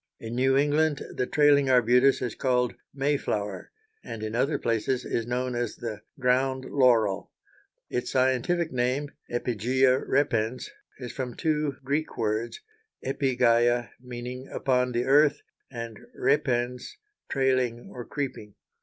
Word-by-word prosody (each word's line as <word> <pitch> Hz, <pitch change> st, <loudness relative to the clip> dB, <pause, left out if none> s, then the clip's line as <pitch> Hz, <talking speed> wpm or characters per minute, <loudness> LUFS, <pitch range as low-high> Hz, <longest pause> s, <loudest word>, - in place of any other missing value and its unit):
In 115 Hz, 0 st, -6 dB
New 130 Hz, +2 st, +3 dB
England 150 Hz, +1 st, +2 dB
the 125 Hz, -, -1 dB
trailing 145 Hz, -2 st, +4 dB
arbutus 125 Hz, +2 st, +4 dB
is 120 Hz, -4 st, -2 dB
called 125 Hz, -2 st, +1 dB, 0.2 s
May 140 Hz, +1 st, 0 dB
flower, 105 Hz, -6 st, -3 dB, 0.3 s
and 110 Hz, -1 st, -7 dB
in 110 Hz, 0 st, -4 dB
other 130 Hz, +6 st, +1 dB
places 115 Hz, +2 st, -1 dB
is 115 Hz, 0 st, -2 dB
known 125 Hz, +1 st, -1 dB
as 120 Hz, -2 st, -2 dB
the 110 Hz, -3 st, -6 dB, 0.2 s
ground 130 Hz, +1 st, +1 dB
laurel. 115 Hz, -8 st, +2 dB, 0.6 s
Its 125 Hz, -, -3 dB
scientific 130 Hz, +6 st, +1 dB
name 130 Hz, +4 st, -1 dB, 0.2 s
(Epigæa 125 Hz, +3 st, +1 dB
repens) 125 Hz, -4 st, 0 dB, 0.3 s
is 125 Hz, -3 st, -7 dB
from 125 Hz, -3 st, -4 dB
two 150 Hz, -3 st, 0 dB
Greek 145 Hz, +4 st, -2 dB
words, 110 Hz, -, -2 dB, 0.4 s
epigæa, 120 Hz, -3 st, +2 dB
meaning 125 Hz, +1 st, -7 dB
"upon 125 Hz, -1 st, +1 dB
the 120 Hz, +1 st, 0 dB
earth," 145 Hz, +2 st, +4 dB, 0.3 s
and 115 Hz, -4 st, -7 dB, 0.2 s
repens, 125 Hz, -4 st, 0 dB, 0.3 s
"trailing, 130 Hz, -3 st, 0 dB
or 125 Hz, -, -6 dB
creeping." 125 Hz, -7 st, -5 dB
125 Hz, 125 wpm, -27 LUFS, 120-135 Hz, 0.6 s, trailing